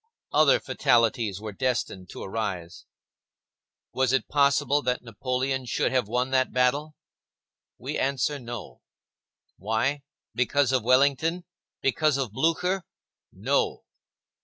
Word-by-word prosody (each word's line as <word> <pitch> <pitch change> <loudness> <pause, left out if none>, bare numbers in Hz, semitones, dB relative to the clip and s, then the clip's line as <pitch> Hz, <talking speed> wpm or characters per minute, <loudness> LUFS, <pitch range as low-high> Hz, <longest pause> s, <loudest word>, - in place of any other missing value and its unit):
Other - - +5
fatalities 115 -4 +1
were 110 0 -6
destined 105 -6 -2
to - - -8
arise. 95 -5 -4 1.1
Was 130 -1 +1
it 135 - +1
possible 145 0 +3
that 125 -2 -1
Napoleon 130 +3 -2
should - - 0
have 130 -5 +1
won 125 +3 -1
that 130 -1 +2
battle? 140 +5 +1 0.8
We - - -4
answer 140 +1 0
No. 120 -2 -8 0.8
Why? 115 +8 -1 0.3
Because 125 +3 +2
of 130 -2 +2
Wellington? 140 +8 +2 0.4
Because 145 +2 +2
of 130 -6 -2
Blücher? 165 - 0 0.5
No. 435 -3 -1
130 Hz, 110 wpm, -26 LUFS, 115-145 Hz, 1.1 s, Other